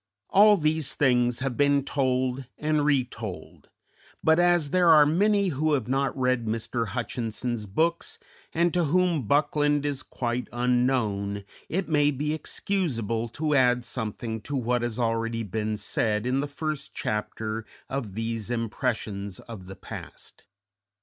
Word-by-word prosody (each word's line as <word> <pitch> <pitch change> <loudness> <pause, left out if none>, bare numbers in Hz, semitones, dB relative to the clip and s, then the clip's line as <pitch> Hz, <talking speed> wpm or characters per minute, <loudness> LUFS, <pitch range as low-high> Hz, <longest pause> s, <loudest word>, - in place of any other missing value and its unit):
All 210 +1 +7
these 155 -2 0
things 125 -3 +2
have 135 -2 -1
been 140 0 +3
told 130 -2 0
and 150 -1 +1
retold; 125 -9 -2 0.5
but, 160 +1 +4
as 175 -4 +3
there 180 -2 +4
are 155 -2 +8
many 200 +5 +3
who 155 0 0
have 130 -6 0
not 135 +2 0
read 125 -3 +1
Mr. 115 +1 -2
Hutchinson's 115 0 -3
books 165 - 0 0.3
and 170 +1 +1
to 175 -2 +2
whom 170 - +1
Buckland 145 +1 +2
is 140 -2 -1
quite 120 0 -3
unknown, 120 -5 0 0.3
it 185 +3 -1
may 145 -2 +3
be 150 +2 -1
excusable 120 - -2
to 150 +6 -1
add 125 -3 +4
something 110 -1 -4
to 145 +7 -5
what 125 -1 0
has 120 -1 -3
already 115 -1 0
been 105 +1 -2
said 105 +1 -1
in 130 +2 +1
the 145 - -1
first 150 +1 -4
chapter 110 +1 -3 0.2
of 120 -8 -4
these 115 -1 -3
impressions 110 -4 -2
of 105 -6 -10
the 95 - -8
past. 95 - -10
125 Hz, 145 wpm, -26 LUFS, 115-150 Hz, 0.5 s, are